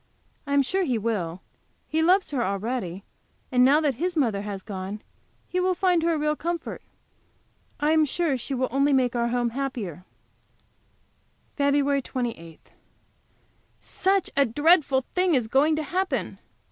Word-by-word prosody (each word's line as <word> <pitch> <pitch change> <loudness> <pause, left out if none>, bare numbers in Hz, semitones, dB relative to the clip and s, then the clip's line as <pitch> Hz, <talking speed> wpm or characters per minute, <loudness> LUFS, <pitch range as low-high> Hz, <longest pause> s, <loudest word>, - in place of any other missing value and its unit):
I 280 - -2
am 280 - +5
sure 380 +8 0
he 255 -8 0
will; 195 -6 -2 0.5
he 315 +1 0
loves 370 +3 +3
her 260 -4 0
already, 200 -2 -3 0.5
and 250 -1 +4
now 280 +4 +5
that 295 -3 +1
his 355 -1 -1
mother 225 -9 +1
has 200 -2 -6
gone 195 +1 -6 0.4
he 365 - -2
will 370 0 +1
find 360 -2 +2
her 335 0 +1
a - - -1
real 300 0 0
comfort. 340 +1 -4 1.0
I 295 +1 +2
am 315 -1 +4
sure 305 0 0
she 260 +2 -4
will 255 0 0
only 275 +2 +2
make 250 -2 +2
our 235 0 +1
home 240 0 0
the - - -15
happier. 235 - -4 1.5
FEB. 280 -1 +2
28. 225 -13 -6 1.1
Such 385 0 0
a 280 - +5
dreadful 290 0 +3
thing 360 -3 +2
is 245 -4 +1
going 285 +6 +3
to 310 - -2
happen! 370 +5 -2
275 Hz, 160 wpm, -25 LUFS, 230-320 Hz, 1.5 s, am